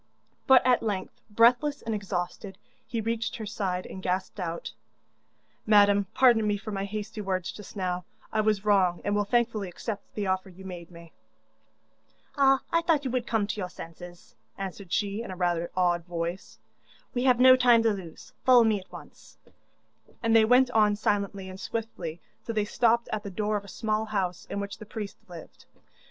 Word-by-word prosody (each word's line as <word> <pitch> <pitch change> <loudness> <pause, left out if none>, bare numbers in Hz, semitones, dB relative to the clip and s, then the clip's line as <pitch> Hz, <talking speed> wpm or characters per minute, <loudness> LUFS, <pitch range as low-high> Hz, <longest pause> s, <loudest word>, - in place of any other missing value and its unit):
But 265 -3 +7
at 250 -1 +4
length, 205 -4 -4
breathless 245 +7 +3
and 225 - -2
exhausted, 195 -1 -4 0.3
he 230 - -2
reached 225 +1 -2
her 225 -4 -6
side, 190 -3 -3
and 190 - -8
gasped 185 +2 -2
out: 170 -2 -4 0.9
'Madam, 205 -2 +5
pardon 235 -4 +5
me 205 -1 +1
for 215 +2 -7
my 195 -1 -2
hasty 215 +1 -5
words 185 -3 -2
just 210 0 -11
now; 180 -2 -2 0.3
I 215 - +2
was 210 -1 0
wrong, 190 -4 +3
and 205 - +1
will 205 0 +1
thankfully 225 -3 0
accept 205 +3 -7
the 210 - -2
offer 190 0 -1
you 190 +1 -13
made 175 -3 -8
me.' 170 -1 -14 1.2
'Ah, 270 -1 +4
I 335 - +4
thought 320 -4 +1
you 260 - -1
would 250 0 -1
come 225 -4 +1
to 210 - -4
your 180 - -3
senses,' 175 +1 -11 0.2
answered 195 -1 -7
she, 205 +1 -1
in 230 - -7
rather 175 -2 0
an - - -9
odd 175 -2 +2
voice. 175 +1 -5 0.6
'We 250 0 -1
have 250 -2 +4
no 255 0 +9
time 245 -3 +5
to 225 -2 +3
lose 180 -5 -10
follow 250 -2 +7
me 220 -2 +2
at 185 - -17
once,' - - -13 0.9
and 230 0 +3
they 220 -1 +7
went 250 +2 +4
on 210 -3 +4
silently 200 -2 -1
and 185 0 -9
swiftly 185 -9 -5 0.2
till 230 - -5
they 210 -1 +1
stopped 235 +2 +2
at 215 - -1
the 205 - -7
door 210 +2 -1
of 205 - -2
a - - -14
small 215 +2 -1
house 190 -5 -3
in 200 - -3
which 200 0 -5
the 215 - -9
priest 210 -2 -6
lived. 170 -2 -12
205 Hz, 190 wpm, -27 LUFS, 185-225 Hz, 1.2 s, no